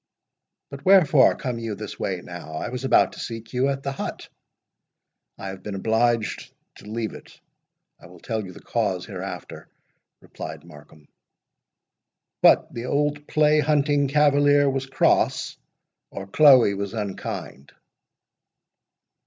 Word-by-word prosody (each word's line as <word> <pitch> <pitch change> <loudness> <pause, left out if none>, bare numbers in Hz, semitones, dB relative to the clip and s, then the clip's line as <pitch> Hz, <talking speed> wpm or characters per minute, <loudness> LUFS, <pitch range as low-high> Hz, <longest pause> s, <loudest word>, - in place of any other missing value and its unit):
"But 140 -1 -9
wherefore 160 -8 +5
come 125 -3 -4
you 115 -2 -4
this - - -8
way - - -3
now? 80 - -9
I - - -4
was 125 +2 -5
about - - +3
to - - -11
seek 115 0 -7
you 125 +2 +1
at 135 0 -3
the 140 - -2
hut." 135 - -6 1.1
"I 95 - -6
have 95 -1 -9
been 100 +1 -6
obliged 115 +2 0 0.3
to - - -15
leave 110 0 -3
it—I - - -18
will 90 0 -15
tell 110 +2 -3
you 95 - -9
the - - -14
cause 100 -6 -2
hereafter," - - -8 0.5
replied 80 0 -9
Markham. 75 -2 -16 1.3
"What! - - +4
the 120 +1 -5
old 145 +1 -1
play 150 0 +3
hunting 145 -1 +2
cavalier 145 0 +3
was 135 -1 -1
cross, 135 - +1 0.5
or 95 - -7
Chloe 130 -1 +6
was 100 +2 -5
unkind?" 95 -9 -6
120 Hz, 135 wpm, -23 LUFS, 100-145 Hz, 1.3 s, Chloe